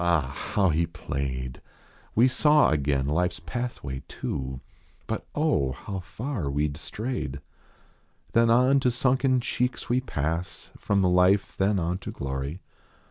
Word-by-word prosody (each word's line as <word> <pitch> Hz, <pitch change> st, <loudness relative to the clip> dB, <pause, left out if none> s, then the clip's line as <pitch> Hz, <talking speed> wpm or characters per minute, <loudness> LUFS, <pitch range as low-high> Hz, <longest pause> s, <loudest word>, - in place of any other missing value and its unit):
Ah! 80 Hz, -6 st, +2 dB, 0.2 s
how 100 Hz, -3 st, +4 dB
he 85 Hz, +1 st, +1 dB
played! 65 Hz, -6 st, -4 dB, 0.5 s
We 120 Hz, +4 st, +6 dB
saw 150 Hz, -, +4 dB
again 70 Hz, -3 st, +1 dB
life 90 Hz, +5 st, +1 dB
s 85 Hz, -, -9 dB
pathway, 80 Hz, -, -4 dB
too; 65 Hz, -1 st, -4 dB, 0.5 s
But -, -, -4 dB
oh! 75 Hz, -, +2 dB
how 95 Hz, +8 st, -6 dB
far 105 Hz, -, -4 dB
we 75 Hz, +2 st, +1 dB
d 70 Hz, -, -8 dB
strayed. 110 Hz, -, -4 dB, 0.9 s
Then 115 Hz, 0 st, +5 dB
on 125 Hz, +4 st, +5 dB
to 130 Hz, -, +2 dB
sunken 130 Hz, +1 st, +2 dB
cheeks 125 Hz, +2 st, -2 dB
we 125 Hz, +2 st, +2 dB
pass. 85 Hz, -, -3 dB
From 100 Hz, -1 st, +1 dB
life 90 Hz, +2 st, +3 dB
then 100 Hz, +1 st, +2 dB
on 90 Hz, +1 st, -1 dB
to -, -, -7 dB
glory. 70 Hz, +5 st, -4 dB
90 Hz, 140 wpm, -27 LUFS, -, 0.9 s, We